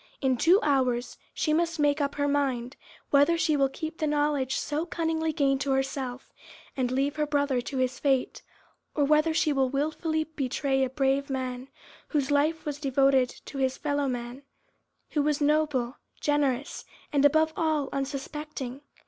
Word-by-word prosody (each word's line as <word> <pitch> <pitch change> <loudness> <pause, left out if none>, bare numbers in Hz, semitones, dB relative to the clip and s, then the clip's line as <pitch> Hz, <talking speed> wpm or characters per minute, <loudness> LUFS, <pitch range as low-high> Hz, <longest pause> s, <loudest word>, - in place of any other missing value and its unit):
In 265 -2 +2
two 345 +10 +5
hours 255 -4 0
she 305 - 0
must 335 0 0
make 290 0 +2
up 285 0 -1
her 285 0 0
mind 270 -3 0 0.4
whether 285 +4 +5
she 315 -2 +2
will 275 -2 +3
keep 315 +4 -6
the 310 - 0
knowledge 290 -3 +1
so 300 +2 -2
cunningly 320 -2 -1
gained 275 -2 +1
to 275 - +1
herself, 265 -1 -3 0.4
and 255 -2 0
leave 275 +3 0
her 300 -1 0
brother 285 -3 +1
to 270 +2 -5
his 255 0 0
fate, 270 -3 0 0.5
or 295 - +2
whether 305 +2 +3
she 315 -1 +2
will 265 -2 +2
wilfully 315 +3 -1
betray 275 -3 -1
a 260 - 0
brave 270 +1 0
man, 255 -1 -3 0.4
whose 290 -3 -1
life 305 +3 +1
was 295 -1 -4
devoted 270 -2 +3 0.2
to 275 - -7
his 265 -1 0
fellow 285 -1 -1
men, 245 +1 -4 0.7
who 295 - +1
was 295 0 +1
noble, 295 -4 +1 0.2
generous, 285 -2 0 0.3
and 285 -1 +3
above 315 +2 +4
all, 310 -3 0
unsuspecting. 275 -1 -5
285 Hz, 165 wpm, -27 LUFS, 265-300 Hz, 0.7 s, two